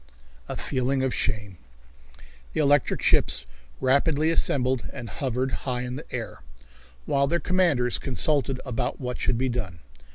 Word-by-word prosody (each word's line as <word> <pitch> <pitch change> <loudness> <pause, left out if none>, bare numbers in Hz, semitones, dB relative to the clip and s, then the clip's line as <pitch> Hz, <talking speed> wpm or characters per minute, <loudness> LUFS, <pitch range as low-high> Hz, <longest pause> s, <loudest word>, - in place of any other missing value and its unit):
A - - -2
Feeling 130 0 0
of 130 -2 0
Shame. 100 -5 -2 0.9
The - - -1
electric 145 -2 +3
ships - - +3 0.3
rapidly 145 +4 +3
assembled 130 -6 +1
and 125 -4 -7
hovered 130 +4 -2
high 125 -1 -2
in 125 0 -4
the - - -9
air, - - -5 0.6
while 140 0 +2
their 170 +4 +1
commanders 170 -11 +2
consulted 135 0 +1
about 125 -4 -2
what 125 -1 -4
should 120 - +1
be 130 +2 +1
done. 110 -8 -3
130 Hz, 140 wpm, -26 LUFS, 125-140 Hz, 0.9 s, electric